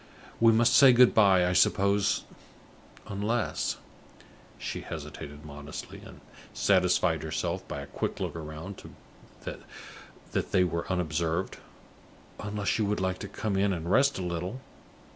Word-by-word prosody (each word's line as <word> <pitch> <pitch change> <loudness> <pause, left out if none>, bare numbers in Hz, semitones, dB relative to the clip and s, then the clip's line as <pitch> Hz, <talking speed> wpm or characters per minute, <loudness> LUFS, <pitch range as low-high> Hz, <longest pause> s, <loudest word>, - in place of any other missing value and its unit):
We 115 0 +6
must 115 +1 +4
say 135 -2 +8
good 125 0 +6
by, 95 -4 +5
I 90 - +1
suppose, 100 +2 +3 0.8
unless" 105 +4 -1 0.8
she - - -5
hesitated 75 +1 -8
modestly, 75 0 -8
and - - -13 0.3
satisfied 90 -2 +2
herself - - -3
by - - -5
a - - -7
quick - - -4
look - - -3
round 80 +4 -7 0.6
that - - -8
they 90 - +4
were 85 0 -2
unobserved 85 0 -1 0.8
"unless 105 +1 -2
you 110 - +2
would 105 +1 -1
like 95 0 -1
to 100 - -6
come 100 +1 -3
in 100 +1 +2
and 85 -1 -3
rest 140 +5 +4
a 95 - -3
little? 90 +8 -4
95 Hz, 135 wpm, -28 LUFS, 85-105 Hz, 0.8 s, say